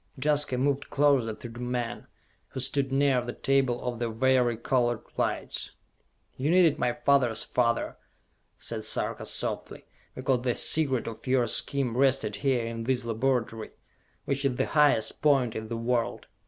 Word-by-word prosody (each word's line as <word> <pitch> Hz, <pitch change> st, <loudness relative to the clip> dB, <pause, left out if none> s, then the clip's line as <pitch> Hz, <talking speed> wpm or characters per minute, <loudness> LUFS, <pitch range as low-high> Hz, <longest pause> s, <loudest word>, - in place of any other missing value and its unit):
Jaska 145 Hz, -2 st, +1 dB
moved 140 Hz, +2 st, 0 dB
closer 135 Hz, -6 st, +2 dB
to 120 Hz, -, -9 dB
the 120 Hz, +1 st, -10 dB
men, 120 Hz, -1 st, -4 dB, 0.4 s
who 130 Hz, -, -7 dB
stood 135 Hz, +1 st, +1 dB
near 135 Hz, -2 st, +2 dB
the 120 Hz, 0 st, -5 dB
table 135 Hz, -3 st, +1 dB
of 120 Hz, -2 st, -3 dB
the 120 Hz, -1 st, -1 dB
vari 120 Hz, 0 st, +2 dB
colored 120 Hz, -1 st, 0 dB
lights. -, -, -2 dB, 0.6 s
"You 135 Hz, +4 st, -1 dB
needed 170 Hz, -3 st, +4 dB
my 120 Hz, -, +1 dB
father's 135 Hz, -6 st, +2 dB
father," 115 Hz, -2 st, 0 dB, 0.6 s
said -, -, -4 dB
Sarka -, -, -1 dB
softly, -, -, -4 dB, 0.3 s
"because 130 Hz, -1 st, 0 dB
the 120 Hz, -1 st, 0 dB
secret 140 Hz, -6 st, +3 dB
of 115 Hz, +3 st, -8 dB
your 130 Hz, -1 st, +3 dB
scheme 125 Hz, +1 st, 0 dB
rested 130 Hz, -6 st, +1 dB
here 125 Hz, 0 st, 0 dB
in 115 Hz, 0 st, -5 dB
this 125 Hz, -1 st, 0 dB
laboratory, 115 Hz, -1 st, -1 dB, 0.5 s
which 140 Hz, 0 st, -1 dB
is 135 Hz, -3 st, +1 dB
the -, -, 0 dB
highest 145 Hz, -8 st, +2 dB
point 135 Hz, -6 st, +2 dB
in 110 Hz, 0 st, -5 dB
the 115 Hz, +1 st, -4 dB
world! 115 Hz, 0 st, -1 dB
125 Hz, 155 wpm, -27 LUFS, 120-135 Hz, 0.6 s, needed